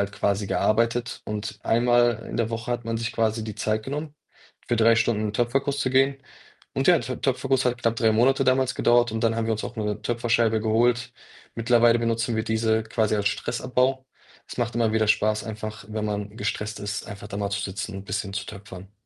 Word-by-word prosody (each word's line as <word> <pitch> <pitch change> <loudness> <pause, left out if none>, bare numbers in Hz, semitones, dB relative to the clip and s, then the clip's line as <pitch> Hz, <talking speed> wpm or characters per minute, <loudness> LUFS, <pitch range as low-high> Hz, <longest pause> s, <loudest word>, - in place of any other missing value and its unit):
halt 100 0 -1
quasi 100 0 0
gearbeitet 115 +4 0
und 105 0 -5
einmal 120 -1 +3
in - - -5
der 115 -1 0
Woche 115 +1 -4
hat 120 0 -2
man 115 0 -2
sich 115 0 -2
quasi 110 0 0
die 110 -1 -6
Zeit 110 +1 -1
genommen, 145 +4 -5 0.5
für 120 - +2
3 115 +1 +5
Stunden 115 -1 +1
in 105 -1 -2
Töpferkuss 135 +5 0
zu 130 - 0
gehen 135 +1 +3 0.6
und 135 - 0
ja, 175 - +7
der 125 0 -5
Töpferkuss 135 0 +1
hat 125 -1 0
knapp 115 -1 +1
3 110 -1 +3
Monate 130 +5 +3
damals 130 0 +2
gedauert 120 -1 +3
und 110 - -2
dann 115 -1 +2
haben 115 - 0
wir 115 - +1
uns 110 - -2
auch - - -7
noch 110 - -2
'ne 105 -1 -3
Töpferscheibe 115 -1 +1
geholt. 120 +2 +1 0.4
Mittlerweile 115 0 +4
benutzen 115 0 0
wir 110 - 0
diese 110 0 +1
quasi 110 -1 0
als 100 -1 +2
Stressabbau. 130 +4 -1 0.4
Es - - -8
macht 120 -1 -1
immer 115 -2 +2
wieder 110 -1 +2
Spaß, 110 0 +2
einfach, 110 -1 -6
wenn 110 0 -3
man 105 0 -4
gestresst 105 0 -3
ist, 105 0 -4
einfach 100 0 -9
da 100 - -6
mal 100 -1 -2
zu 100 0 -1
sitzen 100 +1 -5
und 95 - -8
bisschen 100 +1 -3
zu 100 0 -3
töpfern. 100 -1 -10
115 Hz, 215 wpm, -25 LUFS, 105-120 Hz, 0.6 s, ja